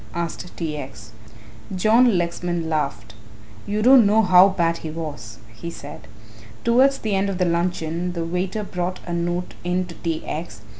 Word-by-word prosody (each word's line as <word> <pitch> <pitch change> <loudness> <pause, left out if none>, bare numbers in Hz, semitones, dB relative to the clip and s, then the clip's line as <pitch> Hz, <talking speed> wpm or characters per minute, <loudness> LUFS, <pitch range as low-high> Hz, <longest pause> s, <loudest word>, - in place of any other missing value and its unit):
asked 170 +1 -5
T. 160 -3 -3
X. 135 -5 -9 0.6
John 220 +3 +4
Lexman 175 -1 -2
laughed. 140 -9 -2 0.5
"You 210 +1 -1
don't 250 -3 +7
know 220 +2 +4
how 185 0 +7
bad 170 -3 0
he 160 - -7
was," 150 -8 -7 0.2
he 140 +10 -7
said. 145 -3 -10 0.6
Towards 265 +4 +4
the 215 -5 -3
end 195 +1 +1
of 195 - -3
the 180 - +2
luncheon 170 0 -1
the 170 -1 -3
waiter 180 +5 -2
brought 180 -1 -3
a 175 - -4
note 175 +1 -2
in 180 +1 0
to 175 - -10
T. 165 -1 -4
X. 155 - -6
175 Hz, 165 wpm, -22 LUFS, 165-190 Hz, 0.6 s, don't